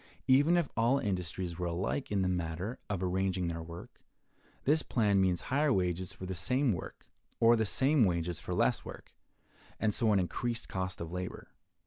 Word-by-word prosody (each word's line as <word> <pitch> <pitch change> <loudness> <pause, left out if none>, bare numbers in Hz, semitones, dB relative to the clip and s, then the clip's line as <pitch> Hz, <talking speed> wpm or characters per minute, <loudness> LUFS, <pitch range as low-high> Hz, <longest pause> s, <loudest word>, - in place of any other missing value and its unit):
Even 145 +7 +5
if 170 -4 +1
all 120 +4 +3
industries 90 -6 -3
were 90 - -1
alike 95 +10 -2
in 100 -2 +1
the - - +1
matter 90 +5 -2
of 100 -3 -2
arranging 90 -1 0
their 85 0 -4
work, 85 +1 -10 0.6
this 155 +3 +3
plan 105 -7 +2
means 90 -2 +2
higher 145 +2 +1
wages 90 -4 0
for 95 - -8
the 95 - -3
same 120 +8 +1
work, 85 - -7 0.3
or 115 +1 +6
the 110 -2 +1
same 135 +4 +3
wages 85 -3 0
for - - -4
less - - +2
work, - - -10 0.7
and 110 -1 +1
so 115 -1 +2
an 100 - +4
increased 115 +6 -2
cost 95 -1 -4
of 85 -1 -5
labor. 90 0 -5
95 Hz, 180 wpm, -32 LUFS, 90-120 Hz, 0.7 s, or